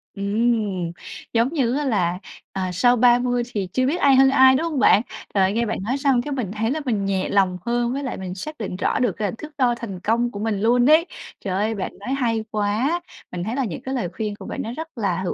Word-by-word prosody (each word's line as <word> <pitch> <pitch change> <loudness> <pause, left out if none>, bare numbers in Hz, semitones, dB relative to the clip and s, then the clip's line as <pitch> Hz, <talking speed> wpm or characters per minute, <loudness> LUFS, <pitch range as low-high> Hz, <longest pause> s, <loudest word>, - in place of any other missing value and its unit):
Ừm, 200 -3 0 0.4
giống 235 +6 +2
như 255 -6 +1
á 295 - -1
là, 180 -7 0 0.3
ờ, 190 - -3
sau 245 +7 +4
30 245 0 +3
thì 195 -3 -2
chưa 255 0 +2
biết 330 +7 0
ai 275 -1 +6
hơn 265 +1 +6
ai, 260 -1 +6
đúng 290 - 0
hông 285 - -1
bạn? 215 - +6 0.3
Trời, 195 -1 +3
nghe 235 +2 +1
bạn - - -2
nói 255 +6 -1
xong 270 -3 +2
cái 290 - -6
mình 245 -9 -2
thấy 225 +3 -1
là 310 +1 -2
mình 210 -5 0
nhẹ 190 -1 -1
lòng 190 -2 +2
hơn 240 +1 0
với 280 - -3
lại 260 - -4
mình 185 -1 -6
xác 305 +10 -7
định 205 -4 -4
rõ 195 - 0
được 245 -5 +2
c 205 +2 -3
thước 305 0 -10
đo 245 -3 +2
thành 200 -6 -7
công 235 +5 0
của 200 - -7
mình 210 -2 -1
luôn 245 +3 +4
ấy. 320 +3 +6 0.3
Trời 195 - -4
ơi, 215 +3 0
bạn 195 - -4
nói 250 +6 -3
hay 230 -5 0
quá! 215 +11 0 0.3
Mình 175 -1 -4
thấy 225 +5 -3
là 270 - 0
những 195 +1 -5
cái 265 0 -4
lời 205 -9 -2
khuyên 210 0 -3
của - - -11
bạn - - -4
nó 230 +2 -5
rất 320 -1 -8
là 190 -4 -1
hữu 180 - -1
235 Hz, 255 wpm, -22 LUFS, 200-260 Hz, 0.4 s, ai